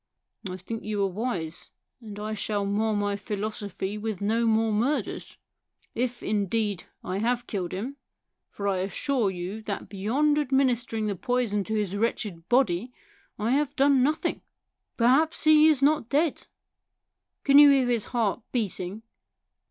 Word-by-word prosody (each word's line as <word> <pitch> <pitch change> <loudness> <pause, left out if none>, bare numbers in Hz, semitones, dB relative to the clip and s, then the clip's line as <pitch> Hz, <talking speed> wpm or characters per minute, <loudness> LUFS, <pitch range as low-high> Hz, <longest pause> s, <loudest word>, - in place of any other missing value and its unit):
" 205 - -11
I 180 - -5
think 220 +5 -6
you 210 -1 -1
are - - +2
wise, 180 -5 -4 0.3
and 210 -3 -9
I 215 +1 -3
shall 205 -1 -1
mar 215 +2 0
my 205 0 0
philosophy 205 -1 -4
with 215 -3 -3
no 225 +3 +1
more 225 0 +2
murders. 245 +8 -1 0.6
If, 245 +1 -2
indeed, 205 -1 -1 0.2
I 185 +2 -3
have 240 +2 0
killed 185 -4 -3
him; 245 +10 -5 0.5
for 200 - -5
I 195 -2 +1
assure 205 +5 0
you 185 +4 -5
that 205 -3 -5
beyond 260 +10 +1
administering 250 -5 +1
the 205 -2 -1
poison 240 -2 0
to 220 - -2
his 205 -3 -1
wretched 200 -5 -2
body 240 -3 +2 0.5
I 220 +3 -1
have 285 +1 +1
done 275 -1 +4
nothing. 300 +5 0 0.6
Per 230 - +2
haps 305 +6 +3
he 310 0 +7
is 295 -4 +3
not 290 -5 +3
dead. 295 +1 0 1.0
Can 280 0 +7
you 290 -1 +9
hear 270 -3 +4
his 235 -3 +1
heart 235 -2 -1
beating 205 -3 -3
220 Hz, 155 wpm, -26 LUFS, 200-255 Hz, 1.0 s, you